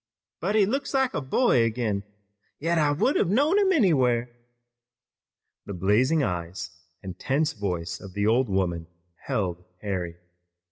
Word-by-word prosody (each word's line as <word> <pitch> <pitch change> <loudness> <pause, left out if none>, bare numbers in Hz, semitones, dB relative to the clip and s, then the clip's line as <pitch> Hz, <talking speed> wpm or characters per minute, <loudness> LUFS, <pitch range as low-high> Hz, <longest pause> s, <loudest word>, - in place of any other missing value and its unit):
But 195 +6 -1
he 210 -2 +5
looks 275 +6 -2
like 265 -2 +2
a - - -1
boy 130 - +3
again! 110 -3 -1 0.6
Yet 165 +2 0
I 150 -1 +3
would 170 - +1
have - - +2
known 290 - +3
him 390 -2 +3
anywhere!" 130 - +2 1.4
The 100 - -5
blazing 120 - +2
eyes 85 -3 -4 0.3
and 95 -1 -8
tense 150 +4 0
voice 85 -6 -3
of 95 -3 -11
the 100 0 0
old 120 +2 +3
woman 90 -4 -1 0.4
held 90 -3 -2 0.2
Harry. 90 -4 -3
120 Hz, 145 wpm, -26 LUFS, -, 1.4 s, he